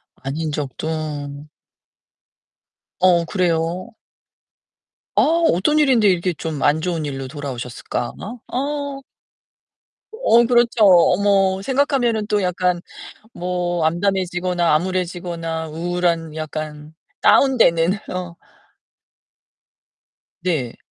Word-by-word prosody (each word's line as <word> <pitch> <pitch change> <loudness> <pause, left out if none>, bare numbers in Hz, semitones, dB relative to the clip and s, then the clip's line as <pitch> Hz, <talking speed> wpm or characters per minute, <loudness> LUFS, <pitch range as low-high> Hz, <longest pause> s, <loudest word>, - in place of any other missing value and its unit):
아닌 150 +4 -4
적도. 145 0 -4 1.5
어 175 -2 +4
그래요. 175 +1 -1 1.3
어 - - +5 0.3
어떤 245 - +2
일인데 260 -8 +4
이렇게 180 -1 +2
좀 160 -1 -5
안 150 +2 +3
좋은 165 -3 -2
일로 135 -2 -5
돌아오셨을까? 125 -4 -5 0.4
어. 280 +1 -3 1.1
어 435 - +4
그렇죠. 235 -2 +3
어머. 190 +1 +4
생각하면은 250 -3 +1
또 210 -1 +1
약간 180 -1 0 0.5
뭐 175 -2 -2
암담해지거나 180 0 0
암울해지거나 170 -2 -3
우울한 170 -1 -1
약간 155 -1 -6 0.3
다운되는 180 -11 +4 0.2
어. 180 -2 -5 2.1
네. 150 -10 -2
175 Hz, 195 characters per minute, -20 LUFS, 160-195 Hz, 2.1 s, 어